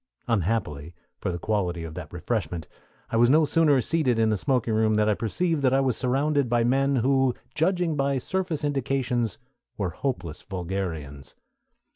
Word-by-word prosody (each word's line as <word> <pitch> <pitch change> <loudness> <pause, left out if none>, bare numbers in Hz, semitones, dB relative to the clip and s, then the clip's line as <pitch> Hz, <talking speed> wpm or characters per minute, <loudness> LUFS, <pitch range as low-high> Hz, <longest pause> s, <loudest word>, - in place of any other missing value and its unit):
Unhappily 90 - -1 0.2
for 95 - -2
the 85 - -3
quality 90 -3 -1
of 80 -1 -7
that 80 -3 -8
refreshment, 85 -3 -3 0.4
I 115 - +1
was 120 +1 +5
no 155 +3 +5
sooner 150 -3 +3
seated 135 -5 +1
in 110 -1 +3
the - - +2
smoking 120 +1 0
room 110 0 +2
that 105 0 +2
I 105 - +4
perceived 155 - -1
that 130 -1 +3
I - - +4
was 130 -4 +1
surrounded 140 +1 +1
by 120 -1 +2
men 135 +3 +2
who, 130 0 +2 0.2
judging 175 0 +1
by 140 -1 +1
surface 170 +2 -2
indications, 130 -5 0 0.4
were 95 -4 -1
hopeless 90 - -4
vulgarians. 85 -7 -5
120 Hz, 165 wpm, -26 LUFS, 95-140 Hz, 0.4 s, was